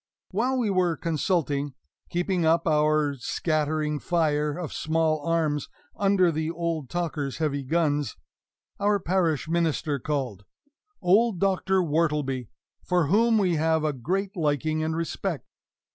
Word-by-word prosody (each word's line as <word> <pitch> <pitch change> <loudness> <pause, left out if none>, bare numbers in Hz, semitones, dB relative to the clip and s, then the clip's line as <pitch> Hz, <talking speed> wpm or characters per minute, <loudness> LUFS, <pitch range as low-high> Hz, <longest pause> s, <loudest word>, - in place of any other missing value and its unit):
While 245 +7 +1
we 230 -5 +1
were 180 -3 +1
consulting 150 -4 -1 0.3
keeping 175 0 0
up 165 +1 +3
our 150 -1 +3
scattering 150 +1 -1
fire 150 -3 0
of 175 -4 -5
small 155 -1 0
arms 155 -3 0 0.3
under 195 -3 +3
the 160 0 -2
old 165 -4 -3
talker's 155 -6 -3
heavy 150 -3 -1
guns 145 - 0 0.6
our 205 0 +2
parish 170 -5 0
minister 160 -3 0
called, 130 - -3 0.6
old 205 +1 +3
Doctor 190 0 +2
Wortleby, 150 -6 0 0.4
for 175 -5 +1
whom 225 +4 +4
we 180 -5 +2
have 160 0 +2
a 155 -1 +1
great 190 - -2
liking 155 -1 0
and 160 0 -1
respect. 165 0 -3
160 Hz, 130 wpm, -26 LUFS, 150-180 Hz, 0.6 s, whom